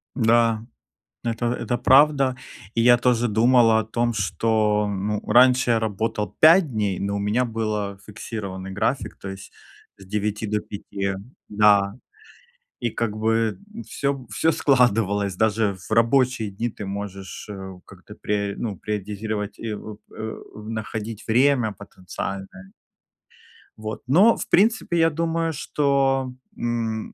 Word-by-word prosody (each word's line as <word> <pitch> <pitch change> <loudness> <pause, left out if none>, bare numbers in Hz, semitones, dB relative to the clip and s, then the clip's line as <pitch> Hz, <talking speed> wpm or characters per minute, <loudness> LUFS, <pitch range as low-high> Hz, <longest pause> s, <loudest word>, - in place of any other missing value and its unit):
Н-да, 115 -2 +3 0.6
это 115 0 -2
это 120 0 -1
правда. 135 -1 +4 0.4
И 115 - +2
я 120 +1 +6
тоже 120 -1 +2
думал 115 +2 +4
о 110 0 +3
том, 120 +2 -1
что, 105 +1 +1
ну, 100 +1 -2
раньше 125 +2 +5
я 115 - +3
работал 105 -1 -2
5 165 +2 +7
дней, 105 -5 -1
но 100 0 -2
у - - -2
меня 105 +5 +1
было 110 -3 -3
фиксированный 100 -3 -6
график, 100 +8 -2
то 95 - -7
есть 95 0 -9 0.5
с 95 - -14
9 105 +2 -2
до 105 +1 0
5. 100 -1 -5 0.4
Да. 100 -1 +4 0.9
И 120 - -1
как 110 -1 -2
бы 110 0 0
н 230 +2 -8
всё 140 -2 -3
всё 110 +9 +1
складывалось. 105 - +2
Даже 110 -1 +1
в - - -18
рабочие 115 -1 +2
дни 110 +5 -3
ты 105 -2 -8
можешь, 100 -1 -6
э, 95 -2 -8
как-то 100 +2 -14
пре 100 -1 -1
ну, 105 -4 -3
приоритизировать 105 +1 -4
и, 115 -1 -4
воп 105 0 -9
э 110 0 -6 0.2
в 105 0 -10
находить 110 0 -5
время 125 -1 +3
потенциальное. 95 -1 -8 1.1
Вот 110 0 -6
но, 190 - +6
в - - -5
принципе, 205 -3 +3
я 165 0 +4
думаю, 165 +1 -1
что, 135 -3 0 0.2
м, 115 -2 -3
110 Hz, 140 wpm, -23 LUFS, 100-120 Hz, 1.1 s, 5